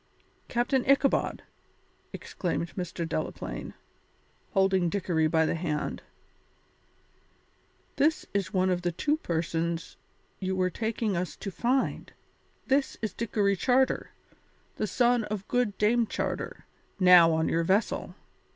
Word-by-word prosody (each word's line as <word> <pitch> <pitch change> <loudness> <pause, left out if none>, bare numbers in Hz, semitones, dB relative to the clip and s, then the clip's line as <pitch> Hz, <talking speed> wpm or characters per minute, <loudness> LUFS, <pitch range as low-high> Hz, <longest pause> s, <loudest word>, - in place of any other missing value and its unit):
"Captain 245 +2 +1
Ichabod," 275 0 +2 0.7
exclaimed 170 -2 -4
Mr. 175 -2 -4
Delaplaine, - - -4 0.8
holding 190 -3 +3
Dickory 165 -4 +1
by 160 0 +2
the - - 0
hand, 155 -3 -3 2.0
"this 310 +2 +2
is 195 -3 -1
one 185 -2 +2
of 180 -1 0
the 175 0 0
two 295 - 0
persons 170 - -2 0.4
you 190 -1 -2
were 185 -1 +1
taking 220 0 -2
us 180 +1 -3
to 195 - -6
find. 250 +7 -1 0.5
This 275 +1 +1
is 220 - -2
Dickory 205 -3 0
Charter, 260 +6 +2 0.7
the 215 - -1
son 240 +1 +2
of 205 -2 -5
good 245 -5 0
Dame 230 +2 +3
Charter, - - -4 0.3
now 180 -3 +8
on 160 0 +1
your 165 - +1
vessel. 195 +6 0
195 Hz, 120 wpm, -28 LUFS, 170-235 Hz, 2.0 s, now